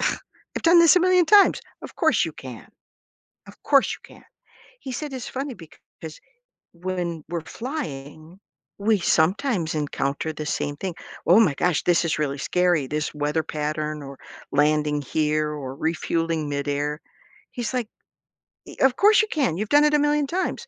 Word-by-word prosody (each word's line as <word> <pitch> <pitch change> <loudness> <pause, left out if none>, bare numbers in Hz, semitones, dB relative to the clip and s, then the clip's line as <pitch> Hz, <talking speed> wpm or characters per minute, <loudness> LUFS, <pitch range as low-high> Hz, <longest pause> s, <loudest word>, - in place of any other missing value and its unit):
I've - - -5
done 340 +1 +6
this 335 +1 +6
a - - +5
million 365 0 +4
times. 405 +4 +5 0.2
Of - - -10
course - - +3
you - - -6
can, - - -10 0.8
of - - -17
course, 275 -2 +4
you - - -19 0.2
can." - - -18 0.6
He 265 - -6
said, 285 +3 -5
"It's 255 -2 -6
funny 270 -1 -3
because 160 -2 -13 0.5
when 175 -2 -4
we're 170 0 -3
flying, 165 - -7 0.4
we 210 0 +2
sometimes 175 - +1
encounter 145 0 -2
the 150 0 -6
same 145 -1 -2
thing. 185 +3 -4 0.3
'Oh 180 +7 +7
my 175 -11 +3
gosh. 175 +2 +1
This 175 -1 +3
is 165 - -1
really 145 -2 -2
scary. 175 -2 +1
This 150 +2 -2
weather 150 +2 -1
pattern 150 0 -3
or 140 -1 -10 0.3
landing 150 0 +2
here 150 +1 0
or 140 -3 -6
refueling 165 0 -1
midair.'" 145 +1 -2 0.5
He's 240 -1 -4
like, 245 -4 -1 0.8
"E - - -12
'Of 265 -1 +4
course, 420 +1 +6
you 435 - -1
can. 265 - 0
You've 210 +2 -3
done 290 +1 +5
it 300 - +2
a - - +3
million 295 0 +1
times. 370 +6 -3
165 Hz, 165 wpm, -24 LUFS, -, 0.8 s, Oh